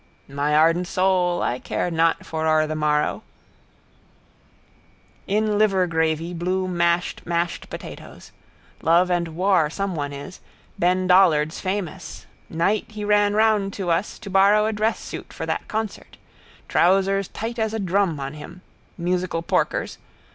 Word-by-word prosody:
—............ - - -36
my 145 +2 -1
ardent 165 +3 +3
soul 185 -1 +1
I 125 - -1
care 175 - -2
not 165 0 +2
foror 155 -1 0
the 155 - -3
morrow. 150 -1 0 2.1
In 210 +1 +1
liver 195 -4 +3
gravy 160 0 -1
Bloom 185 +1 -2
mashed 170 0 0
mashed 170 0 -2
potatoes. - - -10 0.5
Love 175 +3 +3
and 175 -1 +1
War 180 -3 +2
someone 165 -5 -3
is. 145 +6 -9 0.4
Ben 180 +1 +2
Dollard's 170 -5 +4
famous. 185 -2 -4 0.2
Night 180 +6 0
he 210 -1 -6
ran 205 0 +3
round 215 -3 +2
to 185 -4 -2
us 180 +5 -1
to 200 -4 -9
borrow 200 +2 +5
a 220 - 0
dress 215 +2 0
suit - - -8
for - - -6
that - - -3
concert. 220 -1 -5 0.5
Trousers 195 +2 +2
tight 230 +2 -5
as 220 -1 0
a 220 - -3
drum 190 -4 0
on 135 +1 -5
him. 175 +4 -11 0.3
Musical 175 -1 -1
porkers. - - -1
180 Hz, 140 wpm, -23 LUFS, 165-195 Hz, 2.1 s, borrow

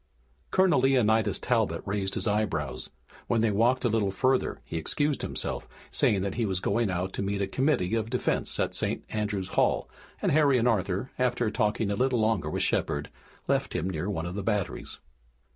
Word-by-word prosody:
Colonel 190 -5 +4
Leonidas 115 -5 +3
Talbot 110 -9 0
raised 100 -1 -2
his - - 0
eyebrows. 80 -11 -1 0.4
When 115 -2 +2
they 110 -1 +2
walked 120 +6 +2
a - - +5
little 110 -3 +1
further 130 +7 +1
he 80 - -4
excused 145 - 0
himself, - - -4 0.2
saying 100 -3 +2
that 100 -1 -2
he 115 -1 0
was 95 -2 -1
going 115 +4 +1
to 95 +1 -2
meet 100 0 -1
a 100 - +1
committee 130 -6 0
of 115 -1 0
defense 125 0 -1
at - - 0
St. - - -2
Andrew's 105 -3 -2
Hall, - - +1 0.3
and - - +1
Harry 145 -3 +4
and 120 0 +2
Arthur, 100 +1 0
after 120 -3 +1
talking 105 -1 0
a - - 0
little 125 +2 +1
longer 110 -8 +1
with - - -1
Shepard, 75 0 0 0.4
left - - 0
him 90 +4 -1
near 90 +3 -3
one 80 -5 -2
of 85 - -4
the 100 - -3
batteries. 105 -2 -2
105 Hz, 185 wpm, -28 LUFS, 95-120 Hz, 0.4 s, a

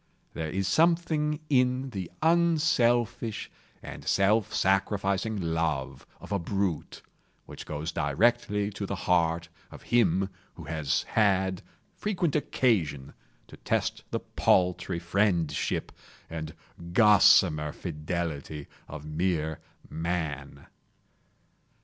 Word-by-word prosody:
There 80 -1 -4
is 95 +4 -1
something 155 - +2
in 130 -1 +1
the 95 -6 -5
unselfish 150 -10 +2 0.3
and - - -8
self 105 +2 +2
sacrificing 100 +1 0
love 80 -5 -2
of - - -12
a 100 - +1
brute, 95 -2 -3 0.4
which - - -10
goes 75 +2 -4
directly 105 - +1
to 100 0 -5
the 100 - -3
heart 85 -1 +2 0.2
of - - -12
him 95 -5 +3 0.3
who 85 - -10
has 75 -2 -1
had 95 -4 +1 0.3
frequent 180 -7 -1
occasion 85 - 0 0.3
to - - -14
test - - -1
the - - -2
paltry 90 0 +1
friendship 85 -3 0 0.4
and 80 -2 -6 0.4
gossamer 90 -7 +5
fidelity 75 -3 -4 0.2
of 75 0 -8
mere 80 0 -1 0.3
Man. 80 -4 -4
95 Hz, 100 wpm, -28 LUFS, 80-110 Hz, 0.4 s, gossamer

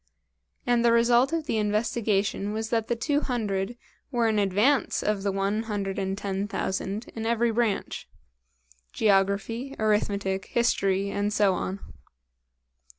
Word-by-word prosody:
And 240 -1 +2
the 235 - +5
result 240 +3 +4
of 330 -2 -1
the 225 - 0
investigation 210 -1 0
was 220 +1 -3
that 225 -2 0
the 240 - 0
two 285 +5 0
hundred 215 -4 -2 0.3
were 240 -4 +1
in 215 -1 +2
advance 205 +8 +2
of 210 -2 0
the 200 0 0
one 195 +2 0
hundred 200 -2 -2
and 195 0 -2
ten 200 0 -2
thousand 200 +3 -3
in 225 - -5
every 235 0 +2
branch 225 -3 -1 0.9
geography, 210 +6 +1
arithmetic, 205 -3 0
history, 200 -4 +1
and 205 +1 -1
so 205 -2 +3
on. 190 +2 -4
210 Hz, 140 wpm, -26 LUFS, 195-235 Hz, 0.9 s, the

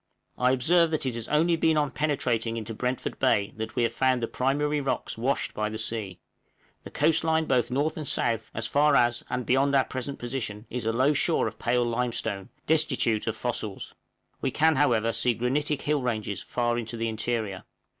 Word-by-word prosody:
I 125 - +2
observe 165 +7 +3
that 155 -3 -1
it 130 - -1
has 115 -1 -5
only 165 +3 +3
been 160 -1 +2
on 145 -2 +1
penetrating 120 -6 0
into 115 0 -5
Brentford 125 +3 -3
Bay 105 -6 +2
that 110 0 -5
we 120 - +2
have 115 0 0
found 130 -1 +1
the - - 0
primary 145 +3 0
rocks 135 - -2
washed 130 +5 -1
by 105 0 -1
the 110 - -5
sea; 110 -4 -3 0.7
the - - -9
coast 165 0 +2
line 160 0 +2
both 125 -5 +1
north 145 +5 0
and 155 -2 -5
south, 115 -3 0
as 110 - -2
far 145 +4 +3
as, 120 -1 +3
and 125 -1 -2
beyond 135 +2 +2
our 135 - +5
present 130 +2 -5
position, 120 -4 -4
is 125 -2 -3
a - - +3
low 130 +6 +3
shore - - +2
of - - -5
pale 120 0 +1
limestone, 115 -4 -2 0.2
destitute 135 -9 +2
of 110 - 0
fossils; 110 -4 -4 0.5
we 135 - 0
can, 160 +4 +3
however, 115 -5 +2
see 120 -2 +1
granitic 140 +5 -1
hill 150 -1 +1
ranges 110 -5 -2
far 120 -1 -1
in 115 - -4
the 115 +1 -3
interior. 110 -3 -2
125 Hz, 195 wpm, -27 LUFS, 115-145 Hz, 0.7 s, our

